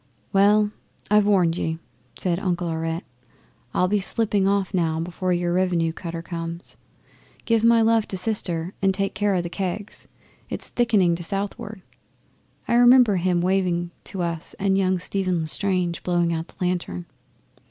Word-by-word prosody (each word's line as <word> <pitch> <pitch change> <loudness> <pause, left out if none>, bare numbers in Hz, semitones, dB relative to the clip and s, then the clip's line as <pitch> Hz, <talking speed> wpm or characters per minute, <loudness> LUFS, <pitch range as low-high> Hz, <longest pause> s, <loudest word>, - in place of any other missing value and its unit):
'"Well, 205 +1 +4 0.4
I've 210 -1 +5
warned 180 -5 +3
ye," 160 0 -2 0.4
says 175 -2 -1
Uncle 175 -3 -1
Aurette. 165 +1 -2 0.7
"I'll 180 - +2
be 205 +2 +1
slipping 200 -1 +1
off 195 -1 0
now 165 -3 +1
before 180 +2 -2
your 175 0 0
Revenue 175 -3 +1
cutter 165 -1 -6
comes. 170 0 -6 0.7
Give 230 -1 +2
my 230 0 +5
love 225 -1 +3
to 190 - -3
Sister 180 -4 -1
and 195 -1 +2
take 195 0 -1
care 205 0 +1
o' 175 - 0
the - - -3
kegs. 190 +3 -5 0.4
It's - - -5
thicking 210 -8 +2
to 175 - -7
southward." 200 +1 -4 0.8
'I 235 - +2
remember 245 -4 +6
him 175 0 +1
waving 180 -2 0
to 190 -3 -4
us 170 -1 -4
and 195 -1 +1
young 185 -1 +2
Stephen 185 -1 -1
L'Estrange 180 +1 -1
blowing 175 -1 +1
out 165 +1 -3
the - - -21
lantern. 175 - -2
185 Hz, 155 wpm, -23 LUFS, 170-200 Hz, 0.8 s, remember